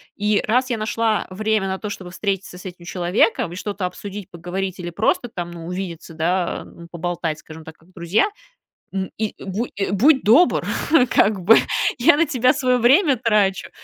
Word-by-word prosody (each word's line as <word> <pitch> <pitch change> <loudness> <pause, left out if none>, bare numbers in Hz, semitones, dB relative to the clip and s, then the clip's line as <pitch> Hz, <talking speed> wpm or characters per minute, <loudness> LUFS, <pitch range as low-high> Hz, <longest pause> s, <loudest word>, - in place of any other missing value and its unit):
И 210 0 +1
раз 250 +4 +1
я 235 - 0
нашла 220 0 0
время 215 +1 0
на 190 0 -2
то, 210 - -6
чтобы 185 -3 -7
встретиться 195 0 -3
с 180 - -13
этим 180 -2 -9
человеком, 180 +1 +1
и - - -7
что-то 200 -1 -4
обсудить, 200 +2 -7
поговорить, 180 +2 -5
или 175 -1 -5
просто 210 +7 0
там, 175 -5 -6
ну, 165 -1 -9
увидеться, 175 -2 -6
да, 175 +2 -1
а, - - -12 0.3
поболтать, 170 -2 -3
скажем 160 +1 -12
так, 160 0 -11
как 165 +3 -25
друзья, 180 - +1 0.7
м, 190 -1 -2
и, 220 -1 -2
бу 200 +5 -3 0.2
будь 265 +8 +4
добр 245 - +4 0.4
как 200 -2 +2
бы. 215 +6 +7 0.4
Я 240 - +6
на 335 +3 +3
тебя 255 -3 +2
свое 255 -3 +1
время 270 - +4
трачу. 210 -5 +1
195 Hz, 180 wpm, -21 LUFS, 175-225 Hz, 0.7 s, бы